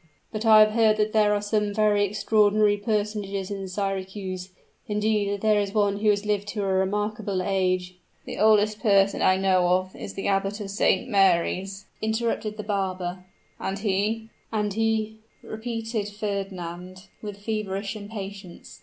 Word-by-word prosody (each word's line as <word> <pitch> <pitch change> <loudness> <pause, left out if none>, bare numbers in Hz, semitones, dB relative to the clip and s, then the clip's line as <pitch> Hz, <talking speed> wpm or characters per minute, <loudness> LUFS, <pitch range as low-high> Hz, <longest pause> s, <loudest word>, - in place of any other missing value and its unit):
"But 220 +1 -3
I 215 -1 +8
have 215 0 +5
heard 220 -1 +3
that 215 0 0
there 210 -1 +4
are 205 0 0
some 210 -1 0
very 210 -1 +3
extraordinary 210 +1 +3
personages 205 -2 -2
in 195 -1 -4
Syracuse; 190 -1 -4 0.4
indeed, 210 -1 0
there 215 -1 +3
is 200 +1 -4
one 205 -1 +2
who 215 0 +2
has 205 0 +1
lived 205 -1 0
to 205 -1 -3
a 195 -1 0
remarkable 205 +1 -1
age 185 -1 0
" - - -39
"The - - -6
oldest 215 0 +4
person 200 -3 +3
I 185 - +4
know 185 -2 +3
of, 185 +1 +1
is 195 - -8
the 195 - -3
Abbot 195 +1 0
of 200 -2 -5
St. 200 +1 +2
Mary's," 195 -1 +1 0.2
interrupted 220 -1 -1
the 210 - -5
barber, 185 -3 -3 0.4
"and 195 +1 -3
he 215 +2 -1
" - - -39
"And 210 -2 -1
he 220 0 0
" - - -38
repeated 225 -1 -4
Wagner, 185 -3 -4 0.3
with 205 -2 -6
feverish 205 -1 -3
impatience. 200 -3 -8
205 Hz, 165 wpm, -25 LUFS, 195-215 Hz, 0.4 s, I